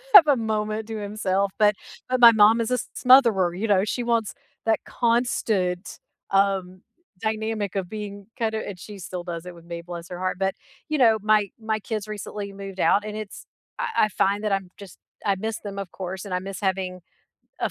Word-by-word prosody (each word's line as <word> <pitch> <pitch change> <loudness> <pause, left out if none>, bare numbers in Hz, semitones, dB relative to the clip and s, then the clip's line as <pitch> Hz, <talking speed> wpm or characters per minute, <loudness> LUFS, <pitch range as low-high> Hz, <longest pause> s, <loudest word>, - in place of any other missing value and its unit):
have 340 -6 +11
a 290 - +5
moment 215 -1 -2
to 225 - -5
himself, 200 -2 -1
but 210 -1 +5 0.3
but, 255 0 +1
my 235 -1 +10
mom 220 +1 +5
is 230 +2 -2
a - - +4
s - - -4
smotherer, 230 -9 +5
you 225 - -1
know, 195 -3 +4
she 240 +3 -2
wants 230 -3 0 0.3
that 225 0 +3
constant, 220 -6 0 0.3
um, 195 -2 +1 0.4
dynamic 220 -2 -2
of 190 -3 -2
being 205 -2 -7
kinda 220 -1 0
and 200 - -6
she 205 +3 -10
still 180 -1 -6
does 170 -1 -6
it 180 - -8
with 170 -1 -15
me, 170 0 -6
bless 170 0 -8
her 180 -1 -6
heart, 185 0 -1
but, 195 0 +1 0.4
you 310 - +1
know, 230 -5 +5
my 210 -1 +3
my 220 -1 -1
kids 215 0 -4
recently 210 -1 -6
moved 195 -1 -8
out 205 - +4
and 210 0 -5
it's 215 -2 -8 0.3
I 485 - 0 0.2
I - - -4
find 200 +1 +1
that 210 - 0
I'm 195 -2 -1
just, 200 -4 -12 0.3
I 200 -2 +3
miss 220 +3 -3
them, 200 -1 -7
of 195 -3 -6
course, 190 +1 -6
and 195 - -5
I 180 - +1
miss 195 0 -6
having 190 -2 -2 0.6
a - - 0
205 Hz, 205 wpm, -24 LUFS, 190-220 Hz, 0.6 s, have